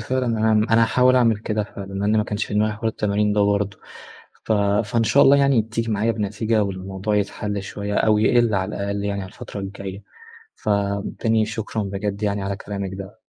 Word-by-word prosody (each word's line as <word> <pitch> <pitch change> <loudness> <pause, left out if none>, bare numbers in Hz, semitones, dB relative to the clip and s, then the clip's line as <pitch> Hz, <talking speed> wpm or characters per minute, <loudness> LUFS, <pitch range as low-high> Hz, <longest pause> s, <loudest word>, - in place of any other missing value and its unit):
فعلًا، 130 +3 -1
أنا 110 -1 +2 0.2
أنا 115 +1 +5
هاحاول 125 +3 +4
أعمل 115 -4 +4
كده 105 0 -2
فعلًا 100 -1 -9
لأن 100 +2 +1
ما 105 - +2
كانش 105 0 -2
في - - -6
دماغي 105 +1 +2
حوار 110 +1 -2
التمارين 105 -1 0
ده 105 - +2
برضه. 100 -1 0 0.7
ف - - 0 0.3
فإن 115 +2 0
شاء 140 +5 +5
الله 140 +1 +7
يعني 140 -5 +4
تيجي 115 +1 -3
معايا 110 +2 +1
بنتيجة 110 +1 0
والموضوع 95 +1 -3
يتحل 100 0 -2
شوية 100 +1 -5
أو 105 0 +3
يقل 115 0 +3
على 95 +1 -1
الأقل 100 0 -3
يعني 100 -1 -2
على 95 - -7
الفترة 110 0 -8
الجاية. 95 0 -7 0.5
فتاني 100 +2 0
شكرًا 110 -1 -3
بجد 100 +1 -4
يعني 100 -1 0
على 100 0 -2
كلامِك 100 -2 -5
ده. 100 +3 -9
105 Hz, 190 wpm, -22 LUFS, 100-110 Hz, 0.7 s, الله